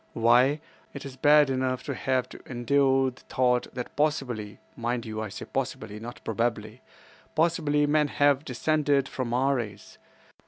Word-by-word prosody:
Why, 125 +6 +4 0.3
it - - -7
is 135 -1 -8
bad 145 +1 +5
enough 130 -1 -1
to 140 - -3
have 130 -1 0
to - - -11
endure 135 +1 +2
the 125 - -19
thought 125 -1 +2
that 125 -1 -6
possibly—mind 120 -4 -2
you, 110 -1 -4
I 110 - -4
say 95 - -7
possibly, 125 -5 -4
not 120 +2 -9
probably—possibly 130 - -2
men 150 0 +2
have 145 -1 +2
descended 145 0 +1
from 130 -3 -4
our 135 +3 +2
race. 105 -4 -7
130 Hz, 145 wpm, -27 LUFS, 120-145 Hz, 0.3 s, bad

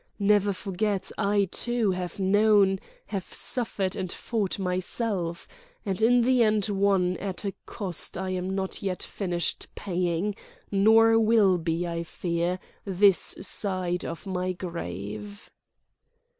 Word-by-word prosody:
Never 205 0 +3
forget, 195 0 -2
I, 200 -1 +2
too, 240 -4 +1
have 180 -2 -4
known, 200 0 +4 0.3
have 195 -3 -5
suffered 205 -6 -2
and 185 -4 -3
fought 215 -5 -2
myself—and 195 - -3
in 245 +2 +5
the 250 +1 +3
end 215 -2 +3
won 195 -3 +2
at 195 +2 -3
a 195 - -2
cost 185 -5 -2
I 190 0 -3
am 185 +1 -2
not 190 -1 -3
yet 190 -2 -2
finished 175 -4 -2
paying, 180 +1 -1 0.4
nor 225 +3 +6
will 215 -5 +4
be, 165 +1 -1
I 170 0 -3
fear, 170 +1 -2 0.3
this 195 -1 +3
side 185 -2 -1 0.2
my 185 -1 -2
grave." 170 - -6
195 Hz, 120 wpm, -27 LUFS, 180-210 Hz, 0.4 s, nor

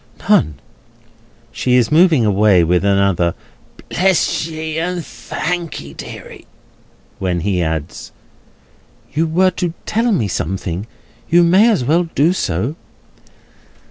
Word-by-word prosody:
"None." 75 -1 +3 1.0
She 125 -1 0
is 125 +2 +2
moving 160 -6 +4
away, 100 -3 +4
with 90 +2 +1
another 100 -4 +2 0.5
"Bless 185 -3 +1
ye, 160 0 -4
and 175 0 -3
thank'ee, 165 - -5
deary!" - - -10 0.7
when 90 -2 -1
he 95 -1 0
adds: 80 -2 -4 1.0
"You 160 +3 +1
were 185 +4 +2
to 175 -2 -3
tell 230 +2 0
me 140 - +1
something; 95 +2 -3 0.4
you 175 +1 +5
may 190 +7 +5
as 205 - +1
well 165 +6 +2
do 160 +6 +3
so." 115 - -2
145 Hz, 115 wpm, -17 LUFS, -, 1.0 s, you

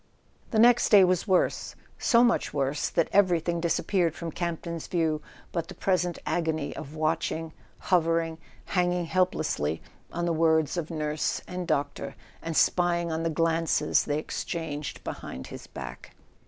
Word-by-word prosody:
The 220 - -1
next 240 +2 +6
day 200 -3 +8
was 185 +2 +2
worse; 185 -2 +1 0.2
so 235 0 +5
much 240 -9 +1
worse 140 +1 0
that 170 - +1
every¬ 185 -4 +4
thing 170 -1 0
disappeared 170 0 +1
from 170 -1 -5
Campton's 170 -1 -4
view 160 -3 0 0.3
but 165 -2 -2
the 190 - -9
pres¬ 185 -2 +1
ent 175 - -5
agony 160 -3 -1
of 145 +3 -8
watching, 160 +1 -1 0.2
hovering, 165 -2 +1 0.3
hanging 180 -1 +1
helplessly 165 - 0 0.3
on 170 0 -2
the 170 - +1
words 160 -1 +2
of 170 -3 -3
nurse 150 -2 -1
and 180 -1 -5
doctor, 145 0 -2 0.3
and 165 -1 -3
spying 175 -1 +2
on 160 0 -1
the 165 - 0
glances 165 0 +2
they 145 - 0
exchanged 155 -1 -4
behind 65 +1 -6
his - - -10
back. 65 -3 -9
165 Hz, 155 wpm, -27 LUFS, 155-180 Hz, 0.3 s, day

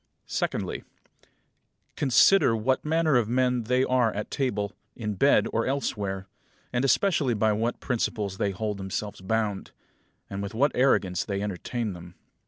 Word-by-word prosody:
Secondly: - - -2 1.1
Consider 135 - +5
what 130 +4 0
manner 155 -2 +2
of 115 -3 +1
men 125 -1 +1
they 125 +3 +2
are 125 -3 +2
at 105 - -4
table, 115 -7 -1 0.2
in 105 -3 -3
bed, 140 +9 +4
or 115 - +1
elsewhere; 100 -8 -2 0.5
and 120 +1 +1
especially 135 - +2
by 110 0 +2
what 115 +3 -1
principles 105 -6 -2
they 100 - +1
hold 105 +1 -3
themselves 95 +1 -4
bound, 105 0 -1 0.6
and 100 0 -5
with 100 +2 -5
what 140 +6 +3
arrogance 100 -9 +2
they 100 -1 -3
entertain 105 +2 -3
them. 90 0 -11
110 Hz, 145 wpm, -27 LUFS, 100-130 Hz, 1.1 s, Consider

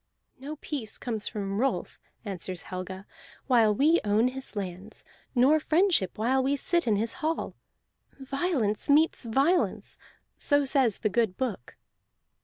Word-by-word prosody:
"No 285 +4 -6
peace 280 -7 -5
comes 225 -3 -4
from 200 -2 -3
Rolf," 270 +2 -1 0.3
answers 185 -2 -5
Helga, 185 +1 -7 0.4
"while 235 -5 +4
we 310 +8 +4
own 215 +4 +2
his 260 -2 -5
lands, 195 +1 -6 0.3
nor 270 +6 +5
friendship 320 - +2
while 250 +5 +2
we 275 +2 +1
sit 340 +3 0
in 215 - +3
his 225 +3 0
hall. 320 +1 -2 0.7
Violence 270 - -1
meets 300 -2 +3
violence, 280 +10 0 0.4
so 285 -1 +2
says 260 -6 +2
the 215 - -1
good 215 -3 0
book." 225 - -4
245 Hz, 135 wpm, -27 LUFS, 205-285 Hz, 0.7 s, nor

